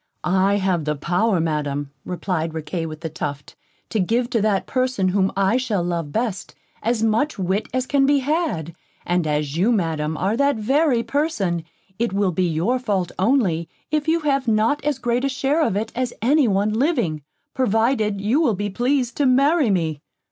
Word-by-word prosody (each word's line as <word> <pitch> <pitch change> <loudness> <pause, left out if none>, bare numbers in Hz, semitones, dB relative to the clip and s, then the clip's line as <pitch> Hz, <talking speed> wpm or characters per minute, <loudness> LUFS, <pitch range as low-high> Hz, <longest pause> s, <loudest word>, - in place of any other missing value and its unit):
"I 190 +2 +2
have 185 -5 0
the 150 0 0
power, 180 +6 +1
Madam," 145 -3 -2
replied 170 -3 -3
Riquet 165 +1 -3
with 155 0 -8
the 165 - -3
Tuft, 145 -2 -6 0.3
"to 220 - -1
give 235 +6 0
to 230 -4 +1
that 205 -2 +1
person 255 -7 0
whom 190 0 +1
I 195 +4 +3
shall 220 -8 -1
love 170 -4 -2
best, 220 -2 -3 0.3
as 230 0 0
much 225 +7 +1
wit 190 +2 -1
as 255 0 -1
can 275 0 +2
be 285 0 +4
had; 275 - -1 0.3
and 175 -2 0
as 150 -1 -1
you, 200 +8 +3
Madam, 160 -7 -1
are 195 +6 0
that 280 +2 +2
very 255 +3 +2
person, 205 - -1 0.3
it 235 -3 0
will 200 -1 +1
be 180 +2 0
your 175 +11 0
fault 200 -8 -1
only, 190 -8 +1 0.2
if 305 0 0
you 330 +1 +2
have 275 -3 0
not 225 +7 +2
as 295 -2 0
great 245 0 -1
a 275 - +1
share 270 +4 0
of 290 - +1
it 220 +2 -2
as 250 -1 -2
any 275 +3 +3
one 205 +1 +1
living, 220 - 0 0.3
provided 220 -3 +1
you 225 +10 +1
will 245 -10 +2
be 205 +1 -3
pleased 250 +3 0
to 285 - +3
marry 275 +2 +3
me." 160 -6 0
210 Hz, 185 wpm, -22 LUFS, 175-255 Hz, 0.3 s, be